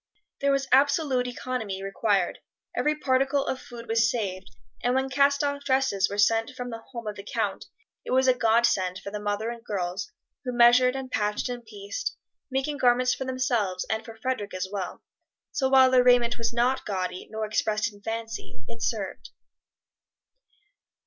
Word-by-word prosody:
There 280 Hz, 0 st, +2 dB
was 275 Hz, -1 st, +1 dB
absolute 275 Hz, -2 st, +3 dB
economy 230 Hz, -6 st, -4 dB
required, 195 Hz, +1 st, 0 dB, 0.4 s
every 300 Hz, 0 st, +1 dB
particle 275 Hz, 0 st, +1 dB
of 260 Hz, -, -3 dB
food 235 Hz, -1 st, -10 dB
was 230 Hz, +1 st, +3 dB
saved, 190 Hz, -, -3 dB, 0.3 s
and 245 Hz, +1 st, +1 dB
when 265 Hz, 0 st, 0 dB
cast 280 Hz, +1 st, +3 dB
off 285 Hz, 0 st, -1 dB
dresses 260 Hz, -8 st, +2 dB
were 200 Hz, -, -5 dB
sent 225 Hz, +3 st, +3 dB
from 245 Hz, 0 st, -5 dB
the 225 Hz, 0 st, -6 dB
home 235 Hz, -3 st, -6 dB
of 210 Hz, -1 st, -4 dB
the 200 Hz, -, -7 dB
Count -, -, -2 dB, 0.4 s
it -, -, -9 dB
was 260 Hz, +1 st, +3 dB
a 255 Hz, -, +6 dB
godsend 225 Hz, -6 st, +2 dB
for 200 Hz, -, -7 dB
the 210 Hz, -, -4 dB
mother 205 Hz, +2 st, -2 dB
and 235 Hz, -1 st, -9 dB
girls, 190 Hz, -, -3 dB, 0.3 s
who 250 Hz, -2 st, -3 dB
measured 245 Hz, +2 st, +6 dB
and 265 Hz, -1 st, -5 dB
patched 210 Hz, +3 st, 0 dB
and 245 Hz, -1 st, -5 dB
pieced, 410 Hz, -, -5 dB, 0.3 s
making 270 Hz, +2 st, -1 dB
garments 250 Hz, 0 st, +4 dB
for 265 Hz, -, -4 dB
themselves, 240 Hz, -8 st, 0 dB
and 220 Hz, 0 st, -1 dB
for 225 Hz, -1 st, -11 dB
Frederic 220 Hz, -5 st, -3 dB
as 185 Hz, 0 st, -2 dB
well; 195 Hz, -3 st, -5 dB, 0.5 s
so 265 Hz, -2 st, 0 dB
while 260 Hz, -1 st, +6 dB
their 255 Hz, -1 st, +6 dB
raiment 245 Hz, -1 st, +5 dB
was 230 Hz, -, 0 dB
not 245 Hz, +3 st, +1 dB
gaudy 185 Hz, -2 st, -3 dB
nor 220 Hz, 0 st, -3 dB
expressed 215 Hz, +1 st, 0 dB
in 205 Hz, -, -17 dB
fancy, 225 Hz, -, -6 dB
it 115 Hz, -, -9 dB
served. 195 Hz, -, -3 dB
240 Hz, 175 wpm, -26 LUFS, 210-260 Hz, 0.5 s, a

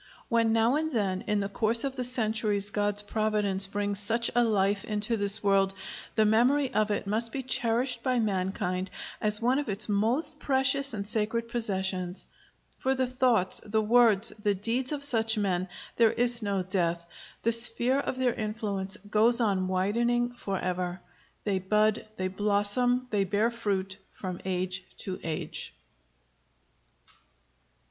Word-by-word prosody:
When 230 Hz, -1 st, +2 dB
now 230 Hz, +4 st, +2 dB
and 315 Hz, 0 st, -2 dB
then 195 Hz, -6 st, -1 dB
in 210 Hz, -1 st, 0 dB
the 200 Hz, -, -2 dB
course 225 Hz, +3 st, +2 dB
of 270 Hz, -1 st, -3 dB
the 255 Hz, -, -3 dB
centuries 215 Hz, -4 st, 0 dB
God's 205 Hz, 0 st, 0 dB
providence 205 Hz, -2 st, +1 dB
brings 205 Hz, 0 st, -3 dB
such 230 Hz, +3 st, 0 dB
a 240 Hz, -, +3 dB
life 200 Hz, -3 st, +1 dB
into 210 Hz, +2 st, -1 dB
this 205 Hz, 0 st, +3 dB
world, 195 Hz, -1 st, +2 dB, 0.4 s
the 220 Hz, -, +3 dB
memory 250 Hz, +6 st, +2 dB
of 215 Hz, +1 st, +1 dB
it 205 Hz, -, -2 dB
must 225 Hz, +3 st, 0 dB
be 270 Hz, -, -4 dB
cherished 245 Hz, -1 st, 0 dB
by 255 Hz, 0 st, 0 dB
mankind 190 Hz, -3 st, -2 dB, 0.3 s
as 210 Hz, +1 st, +3 dB
one 255 Hz, +3 st, +2 dB
of 290 Hz, -, -4 dB
its 200 Hz, +1 st, +3 dB
most 245 Hz, +10 st, 0 dB
precious 270 Hz, -2 st, +1 dB
and 200 Hz, -1 st, -5 dB
sacred 225 Hz, +1 st, -1 dB
possessions. 190 Hz, -5 st, -3 dB, 0.5 s
For 265 Hz, +1 st, -1 dB
the 260 Hz, 0 st, 0 dB
thoughts, 250 Hz, -6 st, +1 dB
the 220 Hz, 0 st, -1 dB
words, 225 Hz, -1 st, +4 dB
the 205 Hz, -1 st, +1 dB
deeds 235 Hz, +7 st, -1 dB
of 290 Hz, -1 st, -3 dB
such 225 Hz, -5 st, +3 dB
men 185 Hz, -3 st, -1 dB, 0.3 s
there 230 Hz, -1 st, +4 dB
is 240 Hz, 0 st, +2 dB
no 200 Hz, -3 st, -1 dB
death; 170 Hz, -2 st, -1 dB, 0.4 s
the 230 Hz, -, +2 dB
sphere 240 Hz, +3 st, +5 dB
of 265 Hz, -, -3 dB
their 255 Hz, -2 st, +1 dB
influence 210 Hz, -3 st, -3 dB
goes 225 Hz, +4 st, +4 dB
on 195 Hz, -5 st, 0 dB
widening 235 Hz, +6 st, 0 dB
forever. 185 Hz, -4 st, -4 dB, 0.4 s
They 195 Hz, -2 st, -1 dB
bud, 210 Hz, +3 st, +1 dB
they 185 Hz, -, -1 dB
blossom, 205 Hz, +6 st, +1 dB
they 205 Hz, -2 st, +1 dB
bear 210 Hz, +4 st, 0 dB
fruit, 200 Hz, -4 st, -3 dB
from 185 Hz, -2 st, -7 dB
age 185 Hz, 0 st, -2 dB, 0.2 s
to 185 Hz, -1 st, -5 dB
age." 160 Hz, -2 st, -5 dB
215 Hz, 155 wpm, -28 LUFS, 195-240 Hz, 0.5 s, sphere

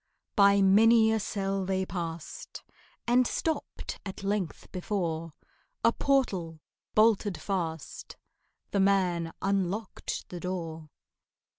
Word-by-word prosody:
By 200 Hz, -1 st, +6 dB
many 220 Hz, +3 st, +6 dB
a 220 Hz, -, +2 dB
cell 195 Hz, -1 st, -2 dB
they 190 Hz, 0 st, 0 dB
past, 170 Hz, -, -6 dB, 0.4 s
And 245 Hz, +1 st, +4 dB
stopped 320 Hz, -1 st, -3 dB
at 195 Hz, 0 st, -7 dB
length 195 Hz, -5 st, -2 dB
before 170 Hz, -4 st, -2 dB, 0.5 s
A 230 Hz, -, +5 dB
portal, 190 Hz, -, 0 dB, 0.4 s
bolted 215 Hz, -3 st, +3 dB
fast: 165 Hz, -6 st, -4 dB, 0.5 s
The 200 Hz, -, +1 dB
man 180 Hz, -4 st, +2 dB
unlocked 195 Hz, +1 st, -2 dB
the 175 Hz, -, -6 dB
door. 165 Hz, -4 st, -5 dB
195 Hz, 105 wpm, -29 LUFS, 175-210 Hz, 0.5 s, By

